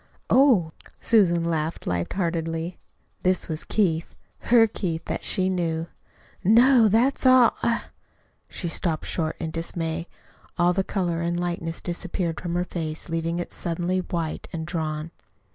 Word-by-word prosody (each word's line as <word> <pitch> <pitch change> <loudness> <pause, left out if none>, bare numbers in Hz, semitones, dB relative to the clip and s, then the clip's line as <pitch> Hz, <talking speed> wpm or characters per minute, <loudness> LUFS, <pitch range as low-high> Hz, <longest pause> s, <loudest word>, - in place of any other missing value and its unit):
"Oh!" 240 - +5 0.3
Susan 180 -7 +3
laughed 160 -1 -2
light 85 -1 -2
heartedly. 165 -1 -2 0.4
(This 185 0 +1
was 155 -1 -4
Keith 170 -6 0 0.2
her 235 -1 +5
Keith 170 -6 -3
that - - -4
she 185 -1 +2
knew.) 170 -3 -1 0.5
"No 235 +3 +6
that's 235 +7 +2
all 255 -2 +6
I 235 - +1 0.4
" - - -38 0.3
She 175 - -5
stopped 165 -1 -2
short 160 -2 -1
in 160 -1 -4
dismay! 165 0 -3 0.5
All 175 0 +3
the 195 +1 +1
color 175 -4 -1
and 170 +1 -1
lightness 170 -2 -3
disappeared 175 -1 -3
from 175 -1 -3
her 175 0 0
face, 160 -2 -5
leaving 165 +1 -1
it 175 - -4
suddenly 175 +2 -2
white 170 -3 -3
and 160 -1 -4
drawn. 160 -2 -3
170 Hz, 145 wpm, -25 LUFS, 165-185 Hz, 0.5 s, No